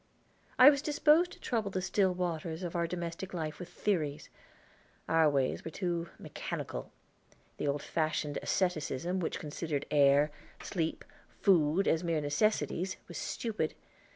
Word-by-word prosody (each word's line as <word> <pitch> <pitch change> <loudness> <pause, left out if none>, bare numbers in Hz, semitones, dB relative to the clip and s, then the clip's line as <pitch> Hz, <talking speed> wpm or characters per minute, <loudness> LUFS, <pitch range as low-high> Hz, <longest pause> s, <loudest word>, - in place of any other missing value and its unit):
I 260 +3 +10
was 280 -1 -1
disposed 305 +3 +4
to - - -14
trouble 225 -4 -1
the 190 - -2
still 185 +1 +2
waters 170 -1 -3
of 175 -1 -4
our 170 -1 +1
domestic 175 +2 -5
life 155 -2 -4
with 180 - -7
theories. 155 -8 -1 0.8
Our 160 -1 +4
ways 135 -2 0
were - - -5
too 170 -1 -2
mechanical. - - -5 0.7
The - - -2
old 140 0 -1
fashioned 155 -2 -1
asceticism 180 0 0
which 170 - -2
considered 150 -1 -3
air, 145 0 +5 0.3
sleep, 165 -4 -2 0.3
food, 175 0 +4
as 165 +2 +2
mere 165 -2 +1
necessities 185 +4 0
was 175 - -6
stupid. 215 -9 -2
170 Hz, 140 wpm, -32 LUFS, 155-190 Hz, 0.8 s, I